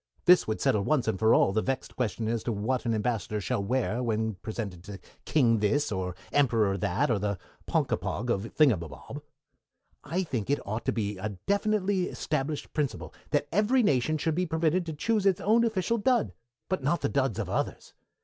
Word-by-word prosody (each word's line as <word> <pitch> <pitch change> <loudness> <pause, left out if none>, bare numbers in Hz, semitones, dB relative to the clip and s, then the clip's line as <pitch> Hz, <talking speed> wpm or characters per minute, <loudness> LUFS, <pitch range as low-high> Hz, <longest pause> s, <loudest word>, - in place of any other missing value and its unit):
This 180 -1 +6
would 110 - -2
settle 105 - +2
once 135 -1 +1
and 105 -4 0
for 110 +2 +5
all 95 - +3
the 110 - +2
vexed 135 +2 -3
question 115 -2 -2
as 115 0 -1
to 120 - 0
what 115 +4 -1
an 115 - +1
Ambassador 105 -2 -1
shall 100 +1 -1
wear 125 +2 0
when 110 -2 0
presented 100 -2 -6
to 100 -1 -8 0.3
King 120 -7 +3
This, 115 +7 +1
or 90 -2 -3 0.2
Emperor 115 -8 +3
That, 90 +5 0
or 110 - +1
the 100 -1 -1 0.3
Ponkapog 120 +3 -1
of 105 +1 -2
Thingumbob. 105 - +1 0.8
I 175 +6 -1
think 125 - -3
it 145 - +3
ought 110 +4 -4
to - - +2
be 105 -3 -3
a 100 0 -4
definitely 200 -2 +1
established 150 -3 -3
principle 150 -4 -2 0.2
that 145 -1 +1
every 215 +8 +3
nation 150 - +2
should 160 +1 0
be 180 +3 0
permitted 165 +2 +1
to 160 - -3
choose 205 +6 +1
its 190 -2 +3
own 225 +4 +3
official 225 0 0
dud, 210 - +2 0.3
but 185 - -1
not 150 +6 0
the - - +1
duds 135 -7 0
of - - -2
others. - - -3
125 Hz, 190 wpm, -28 LUFS, 105-165 Hz, 0.8 s, This